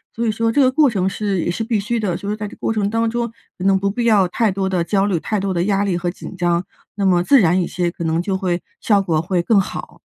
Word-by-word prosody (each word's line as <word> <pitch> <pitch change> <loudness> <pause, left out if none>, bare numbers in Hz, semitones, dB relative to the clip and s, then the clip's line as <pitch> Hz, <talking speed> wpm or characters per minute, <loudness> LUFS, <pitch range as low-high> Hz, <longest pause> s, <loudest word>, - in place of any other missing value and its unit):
所 235 - -1
以 220 - +2
说 225 +1 0
这 285 - +4
个 255 - +4
过 290 +1 +4
程 190 -4 0
是 195 -2 -2
也 175 - -1
是 225 +6 -3
必 225 -3 0
须 230 +3 -1
的， 190 -5 -1
所 200 +3 -4
以 - - -1
在 210 - -4
这 - - -11
个 - - -30
过 - - 0
程 210 -2 0
当 225 +1 0
中， 235 +1 -1 0.3
可 185 - -5
能 195 0 +4
不 200 +1 0
必 235 +3 -2
要 210 -5 +4
太 220 +4 +1
多 190 0 -1
的 180 -3 0
焦 195 +2 +1
虑， 190 -5 0
太 210 +6 -2
多 195 -1 -1
的 170 -1 0
压 200 0 +1
力 190 -4 0
和 175 0 -2
紧 185 +1 -9
张， 175 0 +1 0.3
那 200 -1 -1
么 180 -2 +4
自 275 +5 +5
然 180 0 +3
一 170 - -1
些 175 -1 -1
可 170 -1 -6
能 165 +1 +1
就 190 +1 -1
会 180 -2 -1 0.2
效 205 -5 +3
果 165 -5 0
会 175 +1 0
更 205 +4 +3
好。 190 - -5
195 Hz, 325 characters per minute, -19 LUFS, 180-220 Hz, 0.3 s, 自